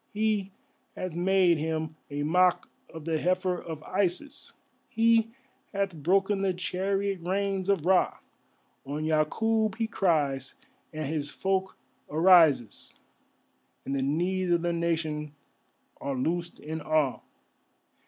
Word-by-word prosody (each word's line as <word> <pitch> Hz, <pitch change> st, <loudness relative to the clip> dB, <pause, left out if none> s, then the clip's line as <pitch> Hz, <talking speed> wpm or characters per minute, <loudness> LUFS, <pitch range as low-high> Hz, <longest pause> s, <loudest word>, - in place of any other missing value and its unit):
He 210 Hz, -2 st, 0 dB, 0.4 s
hath 185 Hz, -3 st, -4 dB
made 180 Hz, -1 st, +3 dB
Him 160 Hz, 0 st, -2 dB
a 145 Hz, 0 st, -3 dB
mock 180 Hz, +3 st, +3 dB, 0.2 s
of 160 Hz, -2 st, -9 dB
the 160 Hz, -1 st, 0 dB
heifer 180 Hz, +1 st, 0 dB
of 160 Hz, -2 st, -7 dB
Isis, 190 Hz, +8 st, -2 dB, 0.4 s
He 230 Hz, -1 st, +3 dB, 0.4 s
hath 195 Hz, -2 st, -1 dB
broken 195 Hz, +6 st, +1 dB
the 190 Hz, -2 st, +1 dB
chariot 195 Hz, +2 st, -1 dB
reins 195 Hz, +1 st, -1 dB
of 190 Hz, -6 st, +1 dB
Ra, 185 Hz, 0 st, +3 dB, 0.7 s
On 145 Hz, +3 st, -4 dB
Yakûb 215 Hz, +8 st, +1 dB
He 225 Hz, 0 st, -1 dB
cries, 150 Hz, -, 0 dB, 0.4 s
and 155 Hz, 0 st, -4 dB
His 145 Hz, 0 st, -2 dB
folk 190 Hz, +3 st, -1 dB, 0.3 s
arises, 160 Hz, -, +4 dB, 0.9 s
And 135 Hz, -, -3 dB
the 135 Hz, -, 0 dB
knees 175 Hz, +7 st, 0 dB
of 170 Hz, -1 st, +2 dB
the 175 Hz, 0 st, 0 dB
Nation 160 Hz, -3 st, -2 dB, 0.6 s
are 140 Hz, -1 st, -3 dB
loosed 170 Hz, +6 st, -2 dB
in 160 Hz, +1 st, -5 dB
awe. 155 Hz, -4 st, +1 dB
175 Hz, 125 wpm, -28 LUFS, 155-195 Hz, 0.9 s, arises